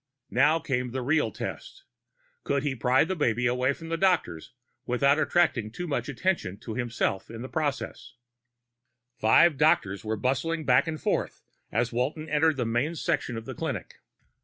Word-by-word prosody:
Now 150 +6 +4
came 125 -5 -2
the 130 +1 -4
real 150 +4 +1
test: 390 - -7 0.6
could 140 0 0
he 145 -2 0
pry 125 +1 +3
the 185 +4 -2
baby 125 -6 +1
away 125 +2 +2
from 165 +3 -8
the 165 - -1
doctors 175 - +1 0.4
without 140 +4 +3
attracting 155 -10 +2
too 150 +11 -6
much 150 -2 -2
attention 140 - -1
to 110 - -6
himself 120 -5 -2
in 115 +1 -7
the - - -5
process? 145 -4 -3 1.0
Five 135 +7 +5
doctors 100 -10 +2
were 110 0 -2
bustling 145 +7 -1
back 130 +4 +4
and 155 -1 -3
forth - - -2 0.3
as 120 +2 0
Walton 145 +6 -2
entered 155 0 +2
the 125 - 0
main 120 +9 0
section 120 -5 -1
of 115 - -7
the - - -6
clinic. - - -5
130 Hz, 165 wpm, -27 LUFS, 120-155 Hz, 1.0 s, Five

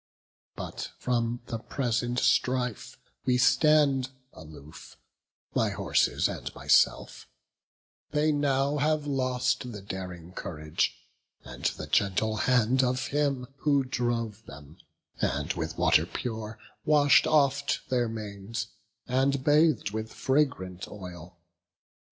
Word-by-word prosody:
But - - -6
from 120 -1 -1
the 115 -1 -4
present 120 0 -2
strife 125 -3 0 0.3
we 125 -1 +2
stand 135 0 +4 0.2
aloof, 75 -1 -13 0.6
My - - +2
horses - - +1
and - - -5
myself; - - +2 0.8
they 150 +1 +2
now 140 0 +1
have 150 +1 +1
lost 130 -2 0
The 105 -3 -8
daring 90 -3 -7
courage 75 -4 -2 0.5
and - - -10
the - - -1
gentle 105 +2 +1
hand 125 +2 +3
Of 125 -1 0
him 140 -3 0
who 140 -2 +2
drove 115 -4 -2
them, 75 +4 -12 0.4
and 70 +5 0
with 80 -2 -4
water 80 +3 +4
pure 110 -1 -5 0.3
Wash'd 145 -2 +5
oft 140 -2 +2
their 120 -3 +1
manes, 110 0 -5 0.4
and 135 +1 +1
bath'd 150 -6 +3
with 110 +1 -4
fragrant 115 -10 0
oil. 90 -3 -10
125 Hz, 110 wpm, -28 LUFS, 100-140 Hz, 0.8 s, Wash'd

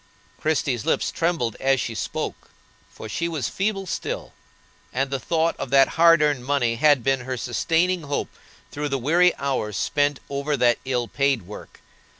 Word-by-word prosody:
Christie's 140 -7 0
lips - - 0
trembled 165 -9 -1
as 135 0 +2
she 115 - -3
spoke, - - -4 0.4
for - - -10
she 170 +11 -2
was 155 -8 -2
feeble 195 0 -2
still, 165 - -4 0.6
and 135 +2 -1
the 135 - -1
thought 165 +6 0
of - - -5
that 135 0 +5
hard 165 -1 +5
earned 145 -4 +1
money 125 -4 0
had 145 -2 +4
been 135 +1 +2
her 130 0 -4
sustaining 165 +9 0
hope 145 -2 -3 0.4
through 150 0 -3
the 135 - 0
weary 170 +7 +3
hours 125 -7 -2
spent 145 -1 +1
over 140 +1 -2
that 120 -1 +3
ill 125 -2 -1
paid 140 -5 0
work. 105 +4 -11
140 Hz, 165 wpm, -23 LUFS, 125-160 Hz, 0.6 s, that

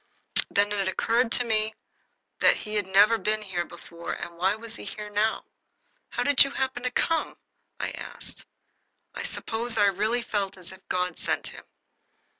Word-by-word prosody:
Then 205 +1 +2
it 200 -2 0
occurred 230 +5 +2
to 245 - +2
me 220 -1 +1 0.6
that - - +6
he 210 - -6
had 205 -3 0
never 205 +4 +5
been 215 0 0
here 180 -4 -2
before, 170 0 -7
and 170 0 -6
why 190 +4 +2
was 225 +1 -7
he - - -8
here 210 -1 -7
now? 215 +2 +1 0.6
"How - - -1
did 285 -2 +7
you 275 - -2
happen 265 -2 -2
to 250 - 0
come?" 325 +6 0 0.4
I - - -2
asked. - - -3 0.7
I - - -5
suppose 230 +1 -1
I 205 - +5
really 215 +5 0
felt 200 -3 -2
as 180 -2 -8
if 190 0 -13
God 180 -2 -1
sent - - -1
him. - - -6
215 Hz, 175 wpm, -27 LUFS, 190-230 Hz, 0.7 s, did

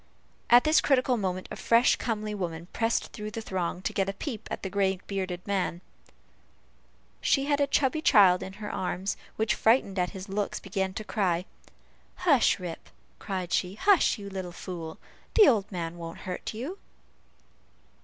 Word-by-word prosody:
At 240 +1 +8
this 310 0 +4
critical 255 -2 +3
moment 185 -4 -2
a - - -4
fresh, 235 +2 +4
comely 215 -2 -2
woman 170 -4 -4
pressed 225 0 0
through 210 -1 -5
the 225 +2 -5
throng 185 -4 -3
to - - -2
get 195 -1 0
a - - -2
peep 220 +2 -6
at - - -5
the 190 - -2
gray 195 -2 +1
bearded 185 -3 -4
man. 190 -4 -1 1.4
She 275 -1 +2
had 285 0 +1
a 285 - +3
chubby 285 +3 +1
child 195 -11 +6
in 190 - -6
her 210 +1 -6
arms, 185 +1 -2 0.2
which, 220 -1 +1
frightened 220 -5 +2
at 180 0 +1
his 190 +1 -8
looks, 200 +1 -2
began 190 -1 -3
to 215 - -4
cry. 185 -5 0 0.7
"Hush, 305 -10 +3
Rip," 175 -3 -7 0.3
cried 185 -3 -4
she, 185 +1 0
"hush, 390 - +4
you 200 -1 -8
little 190 -2 -5
fool; 170 -2 -7 0.4
the 430 - +8
old 210 -6 +2
man 170 -2 -4
won't 165 0 -7
hurt 180 - -4
you." 275 - -6
200 Hz, 170 wpm, -28 LUFS, 185-230 Hz, 1.4 s, At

